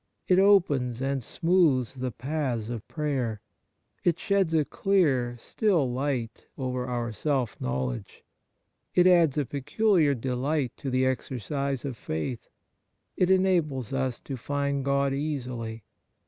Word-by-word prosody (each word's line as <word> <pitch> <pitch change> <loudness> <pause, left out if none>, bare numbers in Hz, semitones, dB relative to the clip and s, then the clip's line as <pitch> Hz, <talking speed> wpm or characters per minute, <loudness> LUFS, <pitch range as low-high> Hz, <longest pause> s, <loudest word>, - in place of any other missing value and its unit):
It 185 0 +5
opens 145 - +3
and 135 0 -1
smooths 160 -4 +2
the 130 -1 -3
paths 125 -3 -3
of 115 -3 -6
prayer. 135 -8 -2 0.6
It 175 -2 +2
sheds 195 -4 +1
a 155 -2 +3
clear, 140 -13 +1
still 165 - +1
light 125 -4 -3
over 125 -2 -2
our 120 -2 -2
self 125 +1 -1
knowledge. 65 -1 -3 0.7
It 180 - +5
adds 170 -6 +5
a 145 - +1
peculiar 150 - +2
delight 130 +2 -1
to 135 - -4
the 130 0 +2
exercise 135 +1 -2
of 135 -3 -3
faith. 105 +11 -4 0.7
It 185 - +2
enables 170 - +2
us 130 -2 -1
to 135 - -6
find 140 +2 -1
God 140 0 +1
easily. 125 -6 -4
135 Hz, 130 wpm, -27 LUFS, 125-155 Hz, 0.7 s, It